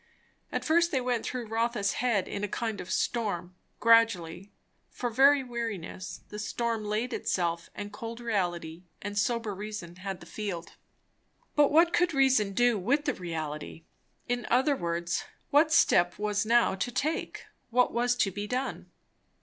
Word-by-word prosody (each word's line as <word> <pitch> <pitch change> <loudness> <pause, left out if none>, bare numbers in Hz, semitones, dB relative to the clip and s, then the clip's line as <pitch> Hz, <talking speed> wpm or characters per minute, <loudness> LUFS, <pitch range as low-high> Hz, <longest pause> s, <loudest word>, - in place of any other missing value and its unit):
At - - -2
first 340 +2 +4
they 270 - +2
went 245 -2 -1
through 250 -2 -4
Rotha's 225 -2 0
head 225 -6 +1
in 200 - -4
a - - +1
kind 220 -2 -3
of 180 - -10
storm; 185 -4 -1 0.3
gradually, 205 -5 +3 0.4
for 245 -1 -3
very 275 +3 +5
weariness, 225 -8 -5
the 210 - -7
storm 230 +1 -2
laid 215 +4 -2
itself, 170 -2 -1
and 205 0 -6
cold 230 +2 -6
reality 175 -7 -2
and 205 +1 -5
sober 225 +1 0
reason 195 -4 -7
had 195 0 -5
the - - -12
field. 195 -6 -5 0.8
But 295 -1 +5
what 335 +3 +5
could 345 -3 +2
reason 260 -7 +3
do 240 0 +3
with 280 +10 +1
the 290 - +1
reality? 160 -2 -5 0.4
In 245 -2 -2
other 265 +4 +3
words, 170 -4 -2 0.3
what 300 +2 +5
step 175 - +4
was 210 0 -1
now 235 -2 +4
to 200 +6 -2
take? 305 +6 -2 0.2
What 250 +1 +3
was 240 +1 +2
to 210 -5 +1
be 205 +2 -5
done? 255 +4 -3
220 Hz, 160 wpm, -29 LUFS, 190-245 Hz, 0.8 s, very